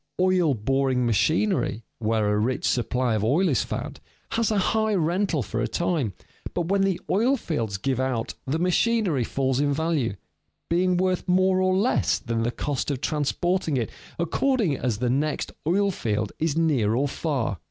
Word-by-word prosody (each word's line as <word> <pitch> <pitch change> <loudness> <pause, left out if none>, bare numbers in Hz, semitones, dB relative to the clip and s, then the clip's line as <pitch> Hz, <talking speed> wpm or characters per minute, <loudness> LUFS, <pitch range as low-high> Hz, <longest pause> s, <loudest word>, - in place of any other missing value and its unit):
Oil 180 -6 +3
boring 130 +3 +1
machinery 155 - +1 0.2
where 110 -2 +1
a 105 - +1
rich 125 +4 0
supply 125 0 0
of 110 -1 0
oil 150 - +3
is 130 - +2
found - - -5 0.3
has 230 -1 +1
a 215 - +1
high 220 +2 +1
rental 175 -3 +1
for 115 +2 -3
a 120 - 0
time, 165 - -1 0.4
but 175 -1 -1
when 200 0 +2
the 195 -2 +1
oil 240 +8 +2
fields 115 - -3
give 130 +5 -1
out 130 -4 -1
the 140 +4 0
machinery 180 - +2
falls 130 +2 0
in 145 0 +2
value, 145 -7 0 0.6
being 180 +1 +2
worth 185 0 0
more 185 +1 +3
or 185 0 +2
less 215 +6 +2
than 115 -1 -2
the 115 - +1
cost 140 +3 -3
of 140 -3 -2
transporting 155 +2 0
it 115 -3 -2 0.3
according 195 - +1
as 125 -5 -1
the 125 +2 0
next 145 +4 -1 0.2
oil 200 +4 +2
field 105 - -2
is 160 -1 0
near 135 -10 +2
or 140 +4 +1
far. 135 - -2
150 Hz, 175 wpm, -25 LUFS, 120-185 Hz, 0.6 s, Oil